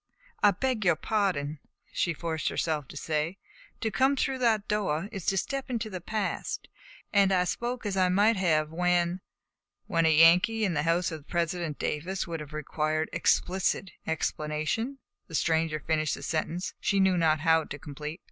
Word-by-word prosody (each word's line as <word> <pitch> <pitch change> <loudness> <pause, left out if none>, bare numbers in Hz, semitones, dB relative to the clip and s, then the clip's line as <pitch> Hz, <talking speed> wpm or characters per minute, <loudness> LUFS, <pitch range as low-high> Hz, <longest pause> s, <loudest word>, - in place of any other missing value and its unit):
"I 205 - +7
beg 230 +3 -1
your 175 -4 +4
pardon," 155 -8 -1 0.3
she 170 - +1
forced 160 -2 -2
herself 155 -4 -1
to 145 - -10
say. 155 +4 -2 0.4
"To 220 - 0
come 265 +4 +3
through 265 0 -1
that 220 -4 +2
door 195 -5 0
is 195 -6 -6
to 195 - +2
step 275 +6 -2
into 230 -3 -2
the 185 -2 -5
past, 215 +2 -3 0.5
and 200 -1 +5
I 180 -1 +3
spoke 240 +6 -3
as 200 -2 -1
I 185 -1 +3
might 205 +5 +4
have 155 -5 +1
when 175 +1 +1 0.3
" - - -59
"When 165 -3 +2
a - - +5
Yankee 180 +7 +6
in 185 - 0
the 145 - +1
house 170 +1 +2
of 155 -2 -8
President 170 -2 -1
Davis 175 +6 -2
would 165 -1 -4
have 150 -2 -8
required 155 +1 -2
explicit 190 +1 +1 0.2
explanation," 160 - -2 0.3
the 165 - -7
stranger 160 -1 +1
finished 155 0 0
the - - -10
sentence 165 +3 -2
she 200 - +1
knew 190 -1 +4
not 160 -3 +2
how 160 -1 +3
to 145 - -7
complete. 150 +3 -7
175 Hz, 175 wpm, -28 LUFS, 155-200 Hz, 0.5 s, I